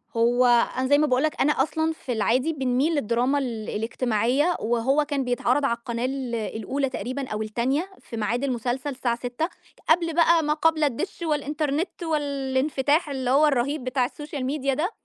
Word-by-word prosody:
هو 240 +2 +3 0.3
أنا 260 0 0
زي 285 +2 +5
ما 305 - +3
باقول 255 0 +2
لك 310 - -1
أنا 295 - +4
أصلًا 315 +2 -1
في 265 - -7
العادي 245 +7 +1
بنميل 265 +3 +1
للدراما 250 +2 +1
ال 230 -5 -4
الاجتماعية 240 +7 0
وهو 240 +6 +1
كان 285 -2 -1
بيتعرض 250 +3 +1
على 235 -3 +1
القناة 235 0 -3
ال 260 -2 -3
الأولى 230 +5 -2
تقريبًا 260 +1 -4
أو 215 -2 -3
التانية 250 - -1
في 230 - -8
ميعاد 225 +4 -1
المسلسل 255 +1 -2
الساعة 255 -3 -1
18:00. 245 +7 -3 0.4
قبل 335 0 +3
بقى 335 0 +4
ما 300 0 +2
قبل 315 0 +2
الدِش 295 +7 -2
والإنترنت 300 +2 -2
والإنفتاح 285 0 0
اللي 260 -3 -2
هو 295 +3 +5
الرهيب 280 +1 0
بتاع 255 0 0
السوشيال 290 0 -6
ميديا 275 0 0
ده. 325 +9 -1
270 Hz, 170 wpm, -25 LUFS, 245-300 Hz, 0.4 s, زي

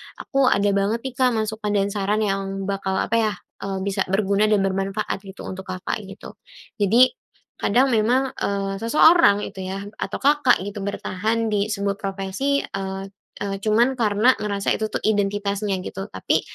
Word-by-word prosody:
aku 275 -3 0
ada 200 -3 +3
banget 200 +4 0
nih 265 -2 -5
Kak 250 -2 +3
masukan 215 -1 -2
dan 200 0 +1
saran 205 +2 0
yang 195 -1 -2
bakal, 195 -1 -2
apa 215 - 0
ya, 215 -2 +1 0.3
eee, 195 -1 -2
bisa 200 0 -1
berguna 200 +2 +2
dan 210 -2 +3
bermanfaat 195 +2 -2
gitu 190 - -10
untuk 190 0 -7
Kakak, 185 +2 -3
gitu. 195 +1 -10 0.5
Jadi 225 +6 +5 0.5
kadang 255 +6 +3
memang, 250 +3 +2
eee, 195 0 -1
seseorang 230 - +5
itu 190 -2 -6
yah 190 +1 -4 0.2
atau 195 - -4
Kakak 285 -6 +4
gitu 205 +2 -6
bertahan 220 +3 -1
disebuah 200 -1 -1
profesi, 195 +9 -1
eee 195 0 -5 0.3
eee, 195 -1 -4
cuman 225 +5 +3
karena 225 0 +3
ngerasa 200 -1 0
itu 215 0 -2
tuh - - -2
identitasnya, 205 -1 0
gitu. 195 +2 -6
Tapi - - 0
205 Hz, 160 wpm, -23 LUFS, 195-220 Hz, 0.5 s, Jadi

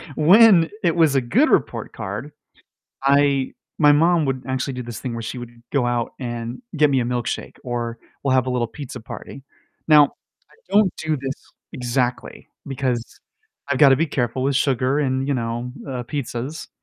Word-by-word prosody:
when 180 +1 +6
it 170 -3 +2
was 160 -4 +4
a 135 - +4
good 235 - +2
report - - 0
card, - - -6 0.7
I 140 -1 +3 0.3
my 150 -2 +6
mom 165 +2 +3
would 135 -2 -2
actually 130 +1 -2
do 125 0 -5
this 120 -2 -7
thing 125 -3 -4
where 115 - -4
she 115 - -5
would 120 -1 -8 0.2
go 140 -4 +2
out 120 -1 -1
and 120 - -5
get 150 0 +5
me 135 -2 +2
a - - 0
milkshake, 120 -1 -3
or 120 -2 -3 0.2
we'll 135 - +1
have 130 -1 +2
a - - -1
little 125 -2 0
pizza 125 +1 -8
party. 125 +4 -9 0.5
Now, 150 -2 +8 0.5
I - - -22 0.2
don't 205 -2 +5
do 155 -1 -1
this 135 0 -3 0.4
exactly 125 0 -2 0.2
because 130 -3 -3 0.5
I've 140 - +1
gotta 135 -2 +7
be 165 +4 +1
careful 130 -3 -2
with 135 0 +1
sugar 135 0 +1
and, 135 -1 -1
you 140 - +1
know, 120 0 -3 0.2
uh, 125 -2 -4
pizzas. 135 +2 -5
130 Hz, 180 wpm, -22 LUFS, 120-145 Hz, 0.7 s, Now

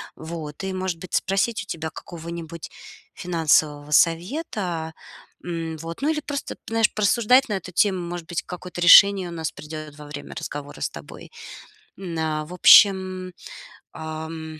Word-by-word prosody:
Вот 160 0 -7
и, 190 - -2
может 185 -2 -3
быть, 185 - -11
спросить 195 +2 0
у - - -14
тебя 160 -3 -4
какого-нибудь 170 -1 -8 0.4
финансового 155 -4 +1
совета. 175 - 0 0.5
М, 165 -2 -4
вот, 165 +2 -8
ну 290 - +1
или 305 -1 -1
просто 285 -1 -5
п - - -42
знаешь, 225 -1 +2
порассуждать 235 +5 +3
на - - -1
эту 185 -1 -10
тему. 190 0 +2
Может 175 -1 -6
быть, 175 - -2
какое-то 180 -1 -8
решение 190 +2 +8
у - - -8
нас 160 -2 -4
придет 155 -1 -9
во 150 - -10
время 145 0 -8
разговора 145 0 -7
с - - -1
тобой. - - -11 0.7
М, 180 -3 -6
на 155 -1 -2
в 170 - -10
общем, 185 0 +6 0.6
ам. 160 0 -7
170 Hz, 155 wpm, -23 LUFS, 160-190 Hz, 0.7 s, решение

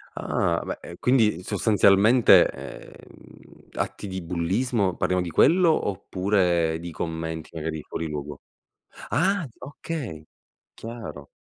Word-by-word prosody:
Ah 85 -1 0
beh, - - -5
e 85 - -10
quindi, 110 -9 +2
sostanzialmente, 105 +3 +5
ehm, - - -13
atti - - -4
di 95 -1 -5
bullismo, 95 +4 0
parliamo 90 0 0
di 90 - -4
quello, 165 - +4
oppure 90 -4 0
di 85 +1 -7
commenti 80 0 -5
magari 80 -1 -4
fuori 80 - -5
luogo? 75 -1 -6 0.7
Ah! 190 +1 +1
Okay, 130 - -6 0.5
chiaro. 115 -11 -8
90 Hz, 110 wpm, -25 LUFS, 80-115 Hz, 0.7 s, sostanzialmente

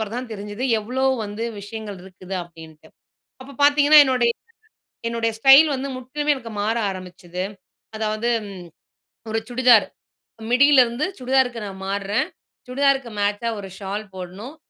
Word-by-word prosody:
பிறகு 220 0 -4
தான் 250 -1 -5
தெரிஞ்சுது 205 +3 -6 0.2
எவ்ளோ 250 +5 -3 0.2
வந்து 205 +2 -5 0.2
விஷயங்கள் 205 -1 -7
இருக்குது? 185 0 -9
அப்பிடின்ட்டு. 160 -2 -14 0.5
அப்போ 275 +2 -11
பாத்தீங்கன்னா, 290 +1 +7
என்னுடைய, 250 -3 +2 0.8
என்னுடைய 230 -1 -1
ஸ்டைல் 270 +5 +8
வந்து 270 +1 -4
முற்றிலுமே 290 +4 -1
எனக்கு 235 -4 -9
மாற 220 +3 0
ஆரம்பிச்சுது. 180 -1 -7 0.5
அதாவது 215 +2 -1 1.0
ஒரு 225 - 0
சுடிதார் 245 -2 +5 0.7
மிடியலிருந்து 260 -1 +4
சுடிதாருக்கு 250 -3 +1
நான் 190 -1 -9
மார்றேன். 200 +2 -1 0.4
சுடிதாருக்கு 270 -1 +1
மேட்சா 205 +3 0
ஒரு 195 - -8
ஷால் 200 +2 -5
போட்ணும். 190 - -8
230 Hz, 125 wpm, -22 LUFS, 200-260 Hz, 1.0 s, ஸ்டைல்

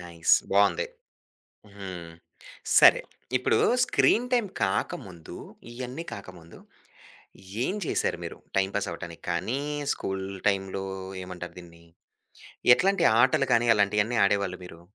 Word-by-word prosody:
Nice 85 -2 +2 0.2
బావుంది. 100 - +3 0.9
హ్మ్. 90 -4 -8 0.7
సరే! - - +7 0.4
ఇప్పుడు 125 - +1 0.3
స్క్రీన్ 245 +2 +2
టైమ్ 235 -4 +2 0.2
కాకముందు. 95 -3 -3 0.4
ఇయన్నీ 125 +6 -6
కాకముందు. 90 -4 -11 1.1
ఏం 190 - -1
చేసారు - - -1
మీరు? - - -7 0.2
టైమ్ 95 0 +1
పాస్ 100 - -1
అవ్వటానికి 85 0 -9
కానీ, 110 +10 -1 0.3
స్కూల్ 95 0 -4 0.2
టైమ్‌లో 95 -1 -2 0.4
ఏమంటారు 90 -1 -8
దీన్ని. 85 -1 -14 0.9
ఎట్లాంటి 195 0 +1 0.2
ఆటలు 135 +2 +3
గాని 120 +1 +3
అలాంటియన్ని 105 +3 +1
ఆడేవాళ్ళు 100 -2 0
మీరు? 85 -1 -12
95 Hz, 110 wpm, -27 LUFS, 90-120 Hz, 1.1 s, సరే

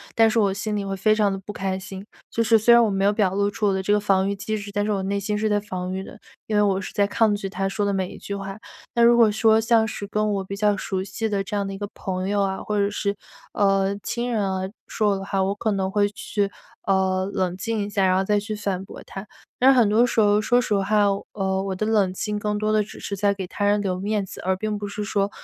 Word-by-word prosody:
但 225 -1 +5
是 230 - -1
我 200 -3 +3
心 210 +1 -3
里 200 - -3
会 195 0 -3
非 215 +3 +3
常 205 -2 +2
地 195 - -4
不 200 +2 -8
开 190 -2 -2
心， 190 +1 -9 0.2
就 230 - 0
是 225 0 +4
虽 235 +3 +4
然 235 0 +7
我 215 - +1
没 195 0 0
有 200 - +4
表 200 -3 +1
露 200 +1 +1
出 210 +1 -2
我 195 - +2
的 190 - -1
这 205 - -1
个 210 - +4
防 195 -1 +2
御 200 - -1
机 215 +2 -3
制， 205 0 -8
但 205 0 -1
是 215 - -1
我 195 -2 0
内 200 +1 -1
心 210 +1 -2
是 215 +1 0
在 205 0 +2
防 185 -3 -5
御 190 +1 -3
的， 210 - -12 0.3
因 215 - -2
为 210 - +4
我 195 -2 +2
是 - - -6
在 200 -1 +2
抗 210 0 +2
拒 195 -1 -4
他 195 0 -2
说 205 +1 -2
的 200 - +1
每 190 -2 -1
一 - - -10
句 200 - -5
话。 195 +1 -6 0.4
那 235 - +1
如 235 0 +6
果 225 -3 +6
说， 220 +1 +4
像 225 -1 +3
是 205 - -5
跟 210 0 0
我 195 -1 -1
比 195 +1 -6
较 205 -1 +2
熟 190 -1 -3
悉 205 +3 -3
的 200 -2 -1
这 205 - -5
样 200 - -1
的 195 - -5
一 - - -6
个 205 - -3
朋 185 0 -3
友 205 -1 +1
啊， 190 0 -1
或 210 -1 -2
者 200 0 +1
是， 200 0 -1 0.4
呃， 195 0 +2
亲 240 +1 -2
人 220 -3 0
啊， 190 -1 -1 0.3
说 210 -2 +1
我 - - +1
的 195 - -6
话， 195 -1 0
我 195 +1 0
可 215 +1 -1
能 190 -1 -1
会 205 0 +2
去， 205 -1 -2 0.4
呃， 190 -1 +2
冷 180 -1 -1
静 225 +3 -2
一 205 - -5
下， 200 -1 0
然 185 0 +3
后 190 - +2
再 205 +1 +2
去 215 +1 -5
反 195 -2 -3
驳 - - -11
他。 195 +1 -8 0.3
但 265 +2 +7
是 260 - +3
很 230 -4 +5
多 230 +3 +4
时 235 - 0
候， 210 0 +4
说 245 +3 +3
实 210 - 0
话， 205 +1 +2 0.3
呃， 190 -1 -1
我 195 -1 -3
的 215 +3 -2
冷 210 -4 +2
静 210 +2 -3
更 210 0 -1
多 215 +1 0
地 215 0 +3
只 - - -11
是 200 - -4
在 200 +1 +2
给 195 -2 -5
他 205 - -5
人 205 0 +3
留 185 -2 -2
面 205 0 -1
子， - - -9
而 190 +1 0
并 215 +2 -3
不 205 0 -5
是 210 +1 -5
说 200 -1 0
205 Hz, 315 characters per minute, -23 LUFS, 195-215 Hz, 0.4 s, 然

